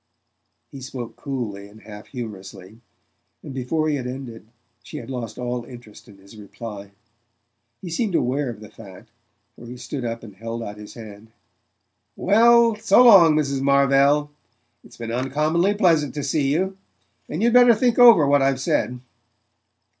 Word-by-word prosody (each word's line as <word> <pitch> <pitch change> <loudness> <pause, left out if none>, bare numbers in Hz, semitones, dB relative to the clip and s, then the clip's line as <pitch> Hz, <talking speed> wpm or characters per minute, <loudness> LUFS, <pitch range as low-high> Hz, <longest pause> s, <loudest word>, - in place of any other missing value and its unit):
He 135 - -10
spoke 125 -3 -8
coolly 115 -8 -6
and 110 +1 -17
half 105 -1 -12
humorously, 100 -3 -10 0.6
and 135 - -9
before 145 +5 -2
he 150 -2 0
had 125 -2 -5
ended 125 -4 -9 0.3
she - - -10
had 120 +2 -9
lost 120 -4 -6
all 125 -1 -4
interest 120 -2 -14
in 100 -3 -16
his 100 +3 -18
reply. 105 -1 -10 0.9
He 175 - -7
seemed 195 +2 -2
aware 135 +1 -1
of 110 -3 -9
the 105 - -12
fact, 100 -4 -15 0.4
for 120 - -13
he 125 +1 -9
stood 130 +2 -6
up 115 -1 -5
and 105 -4 -12
held 115 +3 -6
out 105 -1 -8
his 105 0 -12
hand. 110 -1 -13 0.8
"Well, 230 +3 +4
so 230 +3 +4
long, 185 -10 +7
Mrs. 140 -3 -1
Marvell. 140 +2 +2 0.5
It's - - -18
been 115 -1 -6
uncommonly 150 - 0
pleasant 160 - +1
to 145 - -4
see 140 -3 0
you; 190 +5 -2 0.5
and 165 +8 -3
you'd 235 0 +2
better 245 -2 +6
think 240 +2 0
over 235 -11 +7
what 140 0 +3
I've 135 -1 +1
said." 125 -1 -1
130 Hz, 160 wpm, -22 LUFS, 115-155 Hz, 0.9 s, long